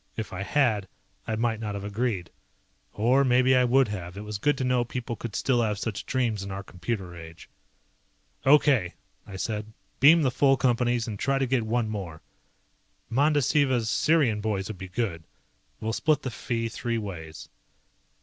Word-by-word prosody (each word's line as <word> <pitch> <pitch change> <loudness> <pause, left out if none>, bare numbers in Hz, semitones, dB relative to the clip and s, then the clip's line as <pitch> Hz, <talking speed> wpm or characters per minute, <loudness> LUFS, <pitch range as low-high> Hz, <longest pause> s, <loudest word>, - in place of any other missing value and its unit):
If 110 -4 -5
I 95 - -4
had 110 -4 +1 0.4
I 110 - -1
might 115 0 0
not 105 -2 -4
have 100 - -5
agreed. 105 -3 -2 0.6
Or 125 +6 +3
maybe 130 0 +4
I 125 - +4
would 130 +1 +4
have, 90 -2 -6
it 105 - -6
was 105 -1 -5
good 145 +5 +2
to 130 - -2
know 125 -1 +2
people 120 -1 -5
could 115 -1 -7
still 125 -3 +2
have 105 -3 0
such 105 -1 -4
dreams 120 -6 0
in 100 - -6
our 95 0 -5
computer 90 -1 -5
age. 80 0 -11 1.0
"Okay," 135 - +4 0.3
I 100 - -9
said, 105 +2 -4 0.3
"beam 160 +4 +7
the 130 - +2
full 135 +1 +3
Companies 120 -2 +1
and 105 -3 -5
try 135 0 +1
to 135 - +1
get 130 -1 +1
one 115 0 0
more. 95 -7 -6 0.9
Mandasiva's 140 -3 +2
Sirian 145 -10 +2
boys 105 -2 -2
would 105 -4 -7
be 95 - -6
good. 90 -6 -2 0.6
We'll 110 +1 -2
split 150 +2 +1
the 130 - -3
fee 115 0 -2
three 115 +1 -3
ways." 85 -7 -7
115 Hz, 175 wpm, -26 LUFS, 100-130 Hz, 1.0 s, beam